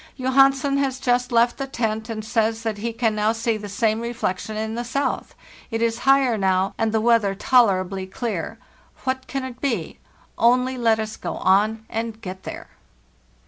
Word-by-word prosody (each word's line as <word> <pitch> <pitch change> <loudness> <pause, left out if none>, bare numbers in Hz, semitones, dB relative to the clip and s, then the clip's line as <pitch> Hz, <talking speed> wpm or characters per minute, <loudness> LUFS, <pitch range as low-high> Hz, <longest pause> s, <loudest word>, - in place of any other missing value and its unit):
Johansen 270 +1 +3
has 270 -2 -1
just 245 0 +1
left 235 +1 +3
the 275 - -4
tent, 220 -3 -2
and 215 -1 -5
says 225 0 0
that 220 -2 -2
he 230 +2 -2
can 225 -2 0 0.2
see 230 0 0
the 210 -1 -7
same 220 +2 0
reflection 220 -3 -3
in 220 0 -3
the 240 +1 -3
south; 260 +2 -2 0.3
it 225 - -2
is 230 0 0
higher 265 -5 +4
now, 190 0 +1
and 225 -1 0
the 220 - +2
weather 220 -3 +3
tolerably 195 -5 +2
clear. 220 0 -4 0.5
What 260 0 -2
can 270 -1 -3
it 250 -1 -8
be? 230 - -2 0.4
Only 250 +2 +3
let 230 -3 +2
us 220 0 -4
go - - -4
on 215 +4 +2
and 225 0 -4
get 190 -3 -7
there. - - -7
225 Hz, 175 wpm, -23 LUFS, 215-250 Hz, 0.5 s, higher